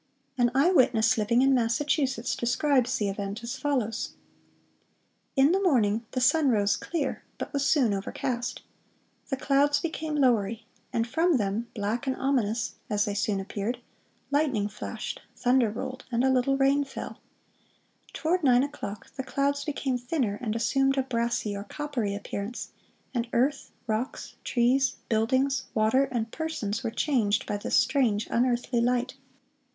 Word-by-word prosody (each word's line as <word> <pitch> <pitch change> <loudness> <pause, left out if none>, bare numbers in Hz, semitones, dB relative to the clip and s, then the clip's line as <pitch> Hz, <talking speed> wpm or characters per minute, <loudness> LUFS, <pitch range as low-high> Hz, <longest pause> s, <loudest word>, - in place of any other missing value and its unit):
(484) 245 - +2
An 255 +5 +3
eye 365 - +4
witness 245 -7 +4
living 230 +3 +2
in 270 0 +4
Massachusetts 260 +1 +1
describes 255 +1 +1
the 205 - 0
event 200 +3 -4
as 235 +2 -4
follows: 260 -5 -2 1.2
"In 275 +2 +5
the 385 +2 +2
morning 230 - +2
the 255 - 0
sun 280 +3 +4
rose 205 -4 +3
clear, 300 -6 -3
but - - -6
was 280 -1 0
soon 255 -9 +3
overcast. 240 +5 -3 0.7
The 270 - -1
clouds 285 +1 +3
became 315 -1 -3
lowery, 230 -5 +2 0.3
and 230 -1 0
from 325 +5 +2
them, 210 +2 -1
black 220 +5 -2
and 260 - +1
ominous, 235 -5 0 0.2
as 205 -1 +1
they 205 - -2
soon 200 0 0
appeared, 205 +5 -3 0.5
lightning 270 -9 +1
flashed, 210 - -6
thunder 250 -2 +3
rolled, 255 +4 -5
and 240 +1 +1
a 265 - +4
little 260 +1 +2
rain 275 +1 +3
fell. 275 - -7 0.9
Toward 335 +2 0
nine 250 -2 +5
o'clock, 275 -8 -6
the 265 - -2
clouds 280 +2 0
became 275 -4 -1
thinner, 245 -5 -1
and 225 -3 -2
assumed 270 +4 +2
a 270 - +2
brassy 235 -4 -1
or 200 - -5
coppery 245 -6 -3
appearance, 205 +3 -5 0.4
and 235 -2 -1
earth, 270 +4 +1 0.2
rocks, 225 +3 -3
trees, 260 +2 +2
buildings, 260 +5 +1
water, 220 +5 +3
and 235 -4 -3
persons 275 -10 -3
were - - 0
changed 230 -3 +1
by 210 - -2
this 205 - -1
strange, 230 -7 +2
unearthly 240 0 +1
light. 250 +1 +1
245 Hz, 150 wpm, -27 LUFS, 220-275 Hz, 1.2 s, In